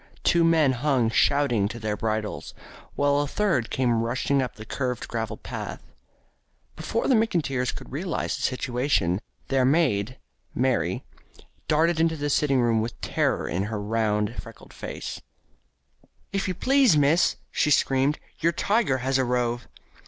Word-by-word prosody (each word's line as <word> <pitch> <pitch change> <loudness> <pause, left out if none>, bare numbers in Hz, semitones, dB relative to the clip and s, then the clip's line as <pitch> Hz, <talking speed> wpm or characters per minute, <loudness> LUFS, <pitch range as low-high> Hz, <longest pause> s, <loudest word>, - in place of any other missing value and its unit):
Two 170 -1 +4
men 160 -4 +4
hung 130 -3 +1
shouting 120 -6 +2
to 115 - -7
their 110 -2 -2
bridles, 110 0 -3 0.4
while 145 0 +2
a 145 - 0
third 145 - 0
came 120 -3 +1
rushing 130 +4 0
up 125 - -4
the 110 - -10
curved 125 +1 -3
gravel 115 -2 -3
path. - - -7 0.9
Before 185 +9 -2
the 270 - +4
McIntyres 160 - +1
could - - -10
realise 170 +6 -2
the 140 - -7
situation, 125 -8 0 0.3
their 135 -1 +2
maid, 125 -5 +2 0.4
Mary, 120 -9 0 0.6
darted 160 +2 +2
into 160 0 +2
the 145 0 -2
sitting 140 -3 +2
room 115 -2 +2
with 115 +1 -5
terror - - 0
in 90 +4 -1
her 105 0 -3
round 105 +1 -1
freckled 115 -2 -14
face: - - -6 1.1
"If 195 0 -1
you 185 - -2
please, 265 - +4
miss," 145 +5 +3 0.2
she - - +1
screamed, 135 0 +2 0.2
"your 170 +1 +2
tiger 200 - +1
has 135 0 +2
arrove." 120 -1 0
130 Hz, 145 wpm, -25 LUFS, 115-150 Hz, 1.1 s, Two